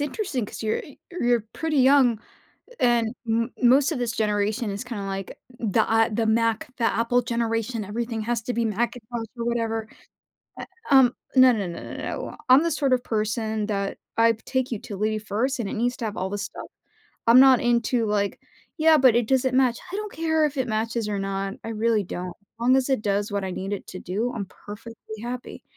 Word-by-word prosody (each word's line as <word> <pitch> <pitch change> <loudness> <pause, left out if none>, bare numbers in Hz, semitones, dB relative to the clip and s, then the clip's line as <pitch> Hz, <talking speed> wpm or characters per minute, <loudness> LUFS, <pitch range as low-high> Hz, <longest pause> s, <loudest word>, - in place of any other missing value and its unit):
interesting 290 - -2
'cause - - -8
you're 220 0 0
e 285 - -11
you're 245 -9 +1
pretty 315 -3 -1
young 260 -4 +5 0.6
and 240 -1 +2
m 230 +2 +1
most 270 +6 +5
of 285 - -3
this 240 -2 -1
generation 210 0 0
is 200 +5 -5
kinda, 230 -5 -5
like, 195 -1 -5 0.2
the, 220 -1 +2
A 225 +1 +2
the 225 +1 0
Mac 225 0 +1
the 235 - 0
Apple 230 +2 +2
generation. 230 -1 -1
Everything 225 +2 -3
has 235 0 -1
to 245 - -3
be 235 - 0
Macintosh 230 +1 -2
or 235 - -3
whatever. 225 -2 -1 0.7
Eh - - -5 0.3
um, 260 -3 +6 0.2
no, 255 -1 +8
no, 205 -6 -1
no, 170 - -6
no, - - -8
no - - -5
I'm 260 +4 +7
the 335 - 0
sort 285 -3 +1
of 250 -1 +1
person 220 -1 -1
that 200 -2 -2 0.2
I'd 230 -1 +4
take 260 -1 -1
utility 215 -1 -2
first 240 +6 -1
and 205 - -2
it - - -5
needs 245 +2 -1
to 235 - -4
have 210 -1 -4
all 190 +1 -2
this 205 +1 -3
stuff. - - -8 0.6
I'm 235 +3 +8
not 265 -2 +7
into, 235 -1 +1
like, 205 -1 -1 0.4
"Yeah, 315 0 +6
but 255 -4 +5
it 240 -2 +2
doesn't 260 0 +2
match." 250 -3 +3
I 390 - -2
don't 425 -1 -5
care 320 -1 +1
if 285 -1 -5
it 255 -2 -1
matches 225 0 -1
or 205 -1 -2
not, 195 0 -3
I - - -5
really 220 -1 +1
don't. 180 0 -5
As 200 +3 -41
long 250 +2 +4
as 265 0 +1
it 265 -6 +1
does 205 0 0
what 200 -1 -1
I 190 - -3
need 190 +2 -4
it 200 - -4
to 185 - -7
do, 210 +8 -2
I'm 200 -4 -4
perfectly 220 +2 -10
happy. 245 +1 -6
230 Hz, 205 wpm, -25 LUFS, 215-250 Hz, 0.7 s, no